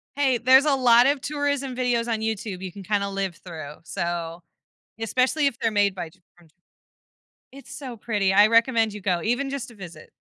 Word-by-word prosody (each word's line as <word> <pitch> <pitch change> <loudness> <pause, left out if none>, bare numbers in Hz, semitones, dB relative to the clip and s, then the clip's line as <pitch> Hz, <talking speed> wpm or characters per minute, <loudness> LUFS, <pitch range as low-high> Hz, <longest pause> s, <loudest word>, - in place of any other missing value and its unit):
Hey, 270 -4 +2
there's 260 +4 +5
a 290 - +3
lot 245 -1 +5
of 280 -2 +1
tourism 285 -3 -2
videos 245 -2 0
on 225 - -1
YouTube 215 -4 -4
you 190 -1 -6
can 200 +2 -11
kinda 200 0 -1
live 195 -3 -3
through, 155 -4 -9
so 170 0 -4 0.6
especially 255 +6 +1
if 250 -3 -3
they're 225 - 0
made 205 -2 +2
by 170 -3 -5
J 185 - -26 0.2
from 175 -2 -21
J - - -30 1.0
It's 275 +1 -12
so 255 -5 -8
pretty, 205 -4 0
I 205 +2 +6
recommend 230 -1 +3
you 210 - -8
go, 180 -3 0
even 250 +5 -1
just 275 -3 -5
to 230 - -15
visit. 170 -5 -11
225 Hz, 200 wpm, -24 LUFS, 190-255 Hz, 1.0 s, I